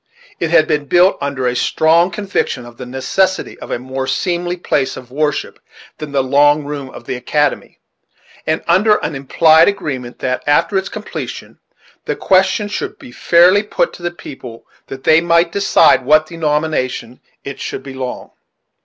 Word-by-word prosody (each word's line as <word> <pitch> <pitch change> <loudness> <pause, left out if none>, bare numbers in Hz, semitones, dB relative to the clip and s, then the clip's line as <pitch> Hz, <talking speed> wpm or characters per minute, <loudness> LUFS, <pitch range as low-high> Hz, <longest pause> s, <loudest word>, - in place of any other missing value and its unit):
It 165 - -1
had 160 -2 +4
been 150 -1 0
built 180 +5 +4
under 140 -2 -3
a 125 0 0
strong 165 +7 +3
conviction 190 - -3
of 120 -1 -13
the 125 - -8
necessity 160 +9 -1
of - - -10
a - - -1
more 130 +2 -5
seemly 175 +5 -1
place 145 -6 -1
of 125 -1 -12
worship 150 +2 -2 0.4
than 150 -2 -7
"the 140 -2 +1
long 145 +3 +3
room 140 -2 -6
of 120 - -12
the - - -4
academy," 150 +4 -1 0.7
and 155 +1 0
under 200 +5 +4
an 155 - -3
implied 160 +4 +4
agreement 130 -11 -3
that, 125 -1 -2
after 165 +7 +2
its 190 0 0
completion, 215 -1 -7 0.5
the - - -2
question 190 +2 +2
should 205 - -5
be - - -13
fairly 175 +9 +4
put - - -1
to - - -12
the 175 - -2
people, 125 -8 -11 0.2
that 135 0 -9
they 160 +3 +5
might 170 0 +2
decide 200 +2 +4
to 130 - -16
what 155 +3 +4
denomination 150 -6 -2 0.2
it 140 -1 -7
should - - -5
belong. 130 -2 -6
150 Hz, 170 wpm, -16 LUFS, 130-175 Hz, 0.7 s, they